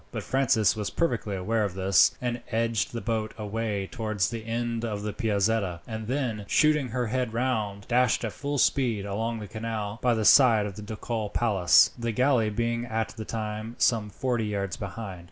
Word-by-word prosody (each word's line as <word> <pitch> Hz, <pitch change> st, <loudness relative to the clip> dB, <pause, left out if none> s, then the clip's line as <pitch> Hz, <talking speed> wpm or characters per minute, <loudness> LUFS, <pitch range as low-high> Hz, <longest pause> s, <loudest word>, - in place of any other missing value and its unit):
But -, -, -5 dB
Francis 120 Hz, -6 st, +2 dB
was 105 Hz, -2 st, -3 dB
perfectly 115 Hz, -11 st, -1 dB
aware 110 Hz, +4 st, 0 dB
of 100 Hz, -3 st, -3 dB
this, 95 Hz, 0 st, +4 dB
and 120 Hz, -1 st, -3 dB
edged 115 Hz, -2 st, 0 dB
the 115 Hz, -, -4 dB
boat 110 Hz, -2 st, -2 dB
away 105 Hz, -2 st, -2 dB
towards 110 Hz, -3 st, -2 dB
the 115 Hz, -2 st, -5 dB
end 115 Hz, 0 st, -2 dB
of 105 Hz, -3 st, -3 dB
the 105 Hz, -1 st, -3 dB
Piazzetta, 100 Hz, -5 st, 0 dB
and 110 Hz, -2 st, -5 dB
then, 120 Hz, -6 st, -2 dB
shooting 150 Hz, -3 st, +3 dB
her 125 Hz, +1 st, -2 dB
head 125 Hz, 0 st, -2 dB
round, 110 Hz, -5 st, -2 dB
dashed 125 Hz, -1 st, +2 dB
at 110 Hz, -, -4 dB
full 145 Hz, 0 st, -3 dB
speed 120 Hz, -7 st, +1 dB
along 110 Hz, +4 st, -2 dB
the 105 Hz, -2 st, -7 dB
canal 110 Hz, 0 st, -4 dB
by 125 Hz, -2 st, +3 dB
the 110 Hz, -1 st, -1 dB
side 115 Hz, -6 st, +6 dB
of 100 Hz, -2 st, -6 dB
the 105 Hz, -, -8 dB
ducal 110 Hz, 0 st, -4 dB
palace, 100 Hz, -7 st, +4 dB
the 115 Hz, 0 st, -1 dB
galley 125 Hz, -2 st, +2 dB
being 115 Hz, +2 st, -1 dB
at 110 Hz, -1 st, -1 dB
the 110 Hz, -1 st, -8 dB
time 110 Hz, +1 st, -4 dB
some 110 Hz, -3 st, +2 dB
forty 120 Hz, 0 st, -1 dB
yards 100 Hz, -3 st, -2 dB
behind. 100 Hz, -1 st, -6 dB
110 Hz, 190 wpm, -27 LUFS, 105-120 Hz, -, side